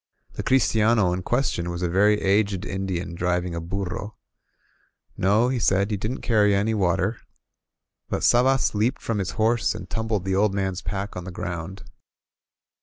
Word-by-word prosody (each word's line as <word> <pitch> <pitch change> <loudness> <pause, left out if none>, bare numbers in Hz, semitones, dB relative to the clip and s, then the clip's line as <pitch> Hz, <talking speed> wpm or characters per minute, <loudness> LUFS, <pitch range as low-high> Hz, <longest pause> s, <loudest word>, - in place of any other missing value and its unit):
The - - -4
christiano 110 -6 +3
in 90 - -2
ques 120 +8 0
tion 85 0 -3
was 85 +1 -4
a - - +2
very 105 +4 +3
aged 100 -1 +1
Indian 95 -2 -3
driving 90 0 -1
a 85 - -3
burro. 100 +4 -4 1.0
No, 105 +6 +2
he 130 -1 -1
said, 100 0 +2
he - - +1
didn't 110 +7 -4
carry 105 -3 +3
any 105 +3 +1
water. 95 +2 +1 0.9
But - - -2
Sabas 130 +2 +3
leaped 110 +6 0
from 115 -3 -1
his 95 0 -3
horse 115 +2 +2
and - - -8
tumbled 110 -4 -2
the 95 - 0
old 100 +1 +2
man's 95 -2 -2
pack 100 0 -4
on 90 -1 -6
the - - -6
ground. 85 +2 -6
100 Hz, 170 wpm, -24 LUFS, 90-110 Hz, 1.0 s, christiano